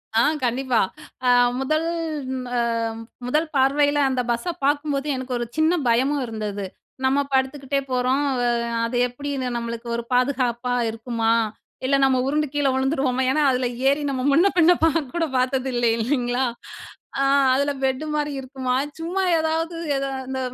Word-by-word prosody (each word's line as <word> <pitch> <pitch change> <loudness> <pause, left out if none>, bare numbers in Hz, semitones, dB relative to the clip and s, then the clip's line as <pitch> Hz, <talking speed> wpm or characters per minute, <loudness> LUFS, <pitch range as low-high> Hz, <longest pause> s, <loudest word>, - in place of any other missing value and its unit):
ஆ 225 - +5 0.2
கண்டிப்பா. 250 0 +1 0.5
அ - - +5 0.3
முதல் 310 +4 0 0.7
அ - - +2 0.7
முதல் 305 +5 +1
பார்வயில 285 +2 +3
அந்த 255 -1 0
பஸ்ஸ 235 +10 -1
பாக்கும்போது 290 0 0
எனக்கு 260 0 -4
ஒரு 240 - -2
சின்ன 315 +2 +3
பயமும் 265 +4 +2
இருந்தது. 210 -3 -4 0.4
நம்ம 270 +2 +3
படுத்துக்கிட்டே 270 +1 0
போறோம், 255 +3 +1 0.2
அ - - +2 0.4
அது 245 +1 -2
எப்டின்னு 265 0 -4
நம்மளுக்கு 235 0 -5
ஒரு 235 - -3
பாதுகாப்பா 250 -1 +1 0.2
இருக்குமா? 225 0 -1 0.5
இல்ல 275 - +3
நம்ம 265 -1 +4
உருண்டு 300 +1 +1
கீழ 290 -1 +1
வுழுந்துருவோமா? 265 -1 0
ஏன்னா 305 +3 +1
அதுல 255 0 0 0.2
ஏறி 280 +2 +3
நம்ம 260 - -2
முன்ன 335 +8 +5
பின்ன 345 0 +6
கூட 325 0 +4
பாக்க 330 +2 -1
பாத்தது 260 +1 0
இல்ல 240 0 +1
இல்லிங்களா? 245 +1 0 0.7
அ, - - +3 0.3
அதுல 280 +2 +1
பெட்டு 265 +3 0
மாரி 295 -1 -1
இருக்குமா? 260 -1 -3 0.3
சும்மா 350 +4 -2 0.2
ஏதாவது 325 +1 -1 0.2
எத 275 0 -1 0.2
இந்த 265 0 -3
265 Hz, 145 wpm, -23 LUFS, 250-290 Hz, 0.7 s, பின்ன